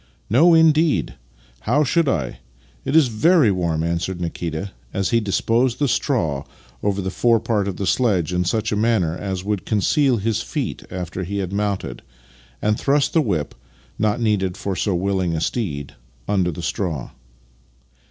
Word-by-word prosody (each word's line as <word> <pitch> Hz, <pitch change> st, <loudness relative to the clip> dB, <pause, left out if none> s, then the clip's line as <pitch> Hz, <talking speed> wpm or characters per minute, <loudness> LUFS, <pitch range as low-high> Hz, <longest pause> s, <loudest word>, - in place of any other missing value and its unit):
" -, -, -38 dB
No 170 Hz, 0 st, +7 dB
indeed! 160 Hz, -1 st, +3 dB, 0.6 s
How 150 Hz, -, +4 dB
should 160 Hz, +2 st, +2 dB
I? 65 Hz, -, -2 dB, 0.5 s
It 135 Hz, -, -1 dB
is 160 Hz, -4 st, +6 dB
very 130 Hz, -, +4 dB
warm," 85 Hz, -4 st, -1 dB
answered 85 Hz, +2 st, -2 dB
Nikita 85 Hz, +2 st, -4 dB, 0.2 s
as 95 Hz, -1 st, -1 dB
he 115 Hz, -, +4 dB
disposed 115 Hz, +4 st, +1 dB
the 145 Hz, -, +1 dB
straw 80 Hz, -, 0 dB, 0.4 s
over 100 Hz, -1 st, 0 dB
the 95 Hz, -, -2 dB
forepart 115 Hz, -2 st, +1 dB
of 95 Hz, -, -4 dB
the 100 Hz, -, -2 dB
sledge 90 Hz, -1 st, +1 dB
in 90 Hz, 0 st, +1 dB
such 110 Hz, +5 st, -1 dB
a -, -, +1 dB
manner 105 Hz, -7 st, +1 dB
as 95 Hz, -1 st, -4 dB
would 105 Hz, -1 st, -2 dB
con 110 Hz, -, 0 dB
ceal 135 Hz, -, +2 dB
his 110 Hz, +2 st, 0 dB
feet 145 Hz, +1 st, -4 dB
after 90 Hz, 0 st, -5 dB
he 100 Hz, +3 st, -4 dB
had 95 Hz, -1 st, -3 dB
mounted, 100 Hz, -10 st, -2 dB, 0.6 s
and 105 Hz, 0 st, +1 dB
thrust 140 Hz, 0 st, +2 dB
the 165 Hz, -, +4 dB
whip 85 Hz, -, -1 dB, 0.5 s
(not 110 Hz, +2 st, +1 dB
needed 100 Hz, -5 st, 0 dB
for 100 Hz, -1 st, -3 dB
so 95 Hz, +2 st, 0 dB
willing 95 Hz, -2 st, 0 dB
a -, -, -1 dB
steed) 80 Hz, -, -3 dB, 0.3 s
under 95 Hz, -3 st, +1 dB
the 85 Hz, 0 st, -6 dB
straw. 80 Hz, -2 st, -3 dB
100 Hz, 170 wpm, -21 LUFS, 90-120 Hz, 0.6 s, No